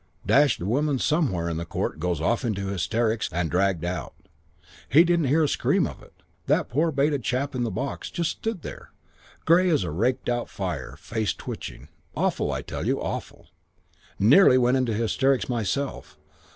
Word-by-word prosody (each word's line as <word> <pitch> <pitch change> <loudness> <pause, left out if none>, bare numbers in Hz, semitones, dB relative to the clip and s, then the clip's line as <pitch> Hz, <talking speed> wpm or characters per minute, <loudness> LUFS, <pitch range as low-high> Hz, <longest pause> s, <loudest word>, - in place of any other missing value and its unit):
Dashed 145 -2 +4
woman 140 +8 +1
somewhere 125 - 0
in 85 -1 -2
the 85 - -3
court 80 - -3
goes 90 -1 -1
off 115 +11 0
into 100 -5 -2
hysterics 110 +5 0
and 85 -1 -1
dragged 90 -2 +1
out. 90 +1 -4 0.7
He 160 +4 +7
didn't 170 -2 +2
hear 155 +5 +3
a - - +3
scream - - +1
of - - -7
it, - - -20 0.2
that - - +2
poor 155 +7 +1
baited 140 0 +1
chap 130 +4 -1
in 125 - -2
the 115 - -1
box. 130 +8 -4
Just 170 -2 -1
stood 220 -7 -4
there. - - -9 0.6
Grey 180 +3 +5
as 155 - +2
a 85 - -3
raked 125 +10 0
out 120 0 -1
fire. 85 -10 -5
Face 110 -3 -2
twitching. - - -8 0.3
Awful. - - 0
I - - -3
tell - - -5
you, - - +1
awful. - - -6 0.7
Nearly 130 - +6
went 125 0 +3
into 125 -4 0
hysterics 130 +4 +1
myself. 115 - -3
120 Hz, 175 wpm, -25 LUFS, 95-140 Hz, 0.7 s, He